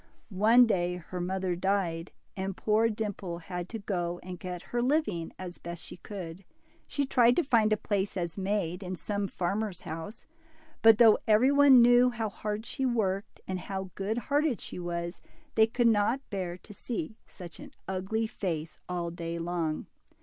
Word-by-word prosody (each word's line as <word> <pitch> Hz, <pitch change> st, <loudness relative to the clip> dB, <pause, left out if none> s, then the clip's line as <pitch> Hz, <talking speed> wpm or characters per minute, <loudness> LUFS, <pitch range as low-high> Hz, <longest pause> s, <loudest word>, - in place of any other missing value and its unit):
One 230 Hz, +4 st, +7 dB
day 180 Hz, -5 st, 0 dB
her 180 Hz, +1 st, -6 dB
mother 185 Hz, 0 st, -1 dB
died, 180 Hz, -2 st, -1 dB, 0.2 s
and 190 Hz, 0 st, -3 dB
poor 220 Hz, +1 st, +3 dB
Dimple 205 Hz, -5 st, -4 dB
had 175 Hz, +1 st, -6 dB
to 230 Hz, -, -4 dB
go 175 Hz, -4 st, -2 dB
and 180 Hz, -1 st, -7 dB
get 180 Hz, -1 st, -6 dB
her 240 Hz, -, +2 dB
living 245 Hz, -, 0 dB
as 180 Hz, -2 st, -7 dB
best 170 Hz, 0 st, -7 dB
she -, -, -10 dB
could. 185 Hz, -2 st, -8 dB, 0.4 s
She 285 Hz, -, -1 dB
tried 245 Hz, -2 st, +4 dB
to 345 Hz, -, +3 dB
find 225 Hz, -5 st, +3 dB
a 215 Hz, -, +4 dB
place 200 Hz, -1 st, -1 dB
as 170 Hz, -2 st, -2 dB
maid 195 Hz, -2 st, -1 dB
in 185 Hz, -1 st, -4 dB
some 200 Hz, +2 st, -2 dB
farmer's 195 Hz, +1 st, -2 dB
house, 165 Hz, +7 st, -7 dB, 0.6 s
but 225 Hz, -1 st, +8 dB
though 225 Hz, -2 st, +7 dB
every 225 Hz, +5 st, +5 dB
one 280 Hz, -4 st, +8 dB
knew 245 Hz, +1 st, +6 dB
how 230 Hz, -3 st, -2 dB
hard 210 Hz, +2 st, -4 dB
she 265 Hz, -, -4 dB
worked, 205 Hz, -6 st, -1 dB
and 185 Hz, -1 st, -2 dB
how 190 Hz, 0 st, -5 dB
good 205 Hz, +3 st, -2 dB
hearted 285 Hz, +1 st, +1 dB
she -, -, -7 dB
was, 170 Hz, 0 st, -4 dB, 0.3 s
they. 220 Hz, 0 st, +5 dB
could 240 Hz, +1 st, 0 dB
not 225 Hz, +5 st, +2 dB
bear 180 Hz, -3 st, -3 dB
to 210 Hz, -, -13 dB
see 220 Hz, -1 st, -5 dB
such 175 Hz, -3 st, -10 dB
an 290 Hz, -1 st, -10 dB, 0.2 s
ugly 190 Hz, +4 st, -1 dB
face 165 Hz, -8 st, -4 dB
all 175 Hz, -1 st, -2 dB
day 170 Hz, 0 st, -4 dB
long. 165 Hz, -2 st, -2 dB
195 Hz, 175 wpm, -29 LUFS, 175-225 Hz, 0.6 s, but